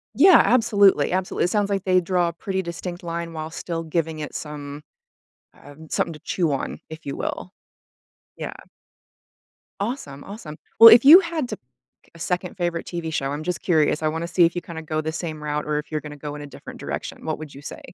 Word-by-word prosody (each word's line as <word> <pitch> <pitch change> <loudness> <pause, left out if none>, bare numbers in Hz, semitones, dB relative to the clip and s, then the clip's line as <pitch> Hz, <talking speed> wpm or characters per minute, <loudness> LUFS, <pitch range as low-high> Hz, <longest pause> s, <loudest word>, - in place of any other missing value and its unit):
Yeah, 375 -3 +8
absolutely, 205 -5 +4
absolu 185 0 -1
It 175 - +2
sounds 205 -1 +1
like 195 -2 -1
they 185 -1 +3
draw 175 -1 +1
a - - -8
pretty 190 +2 -3
distinct 175 +1 -6
line 170 0 -4
while 160 0 -5
still 165 0 -4
giving 160 -1 -2
it 150 - -6
some 145 -1 -7 0.8
um, 145 +2 -13
something 165 - 0
to 150 - -11
chew 170 -5 -1
on, 135 - -3
if 160 0 -10
you 140 - -4
will. 180 - -4 0.8
Yeah. - - -5 1.3
Awesome, 200 - -4
awesome. 180 -7 -9 0.2
Well, 230 - +13
if 240 +3 +6
you 325 +6 +11
had 335 -6 -3
to - - -3 0.5
k - - -27
a 170 - -14
second 180 +2 -3
favorite 175 -2 -2
TV 170 -2 -4
show- 135 -2 -1
I'm 150 +2 -4
just 180 +1 -3
curious; 160 -3 +2
I - - +3
wanna 165 +2 -3
see 175 0 +4
if 170 +1 +2
you 175 - -3
kinda 165 -1 -8
go 155 0 -2
the 155 0 -3
same 155 -2 -5
route 150 0 -2
or 150 -1 0
if - - -16
you're 155 -1 -2
gonna 150 -1 -9
go 145 0 -6
in 145 - -8
a - - -7
different 140 - -11
direction- - - -6
what 155 - -2
would 155 -2 -8
you 140 - -10
say? - - -8
165 Hz, 215 wpm, -23 LUFS, 155-185 Hz, 1.3 s, Well